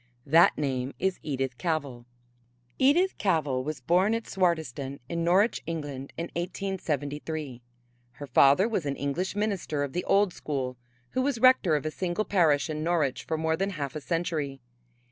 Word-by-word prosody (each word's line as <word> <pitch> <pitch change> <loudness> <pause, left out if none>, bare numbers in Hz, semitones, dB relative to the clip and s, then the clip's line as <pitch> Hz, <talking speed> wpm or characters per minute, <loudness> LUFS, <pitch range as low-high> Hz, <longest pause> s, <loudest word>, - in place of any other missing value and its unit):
That 165 +4 +5
name 135 -2 -2
is 190 0 -1
Edith 135 -3 -3
Cavell. 140 -8 -2 0.7
Edith 340 +8 +3
Cavell 150 -9 +1
was 150 -1 -5
born 185 - +3
at 230 - -3
Swardeston 155 -7 -1
in 170 +2 -2
Norwich, 190 +7 +3
England, 145 -5 -5
in 170 +1 -4
1873. 155 -6 -3 0.5
Her 145 - -8
father 140 - +5
was 190 -10 -2
an 140 - -1
English 155 +9 -2
minister 195 -8 -1
of 140 - -4
the 180 - -1
old 200 -2 +3
school 130 -4 -3 0.4
who 255 - 0
was 270 -1 0
rector 230 -9 +5
of 150 - -2
a 155 - -1
single 180 +5 -2
parish 160 -7 +3
in 155 -1 -3
Norwich 160 -6 0
for 160 - -1
more 160 0 +1
than 195 +4 -1
half 150 -6 -5
a 155 - -4
century. 155 -5 -2
160 Hz, 165 wpm, -28 LUFS, 140-185 Hz, 0.7 s, That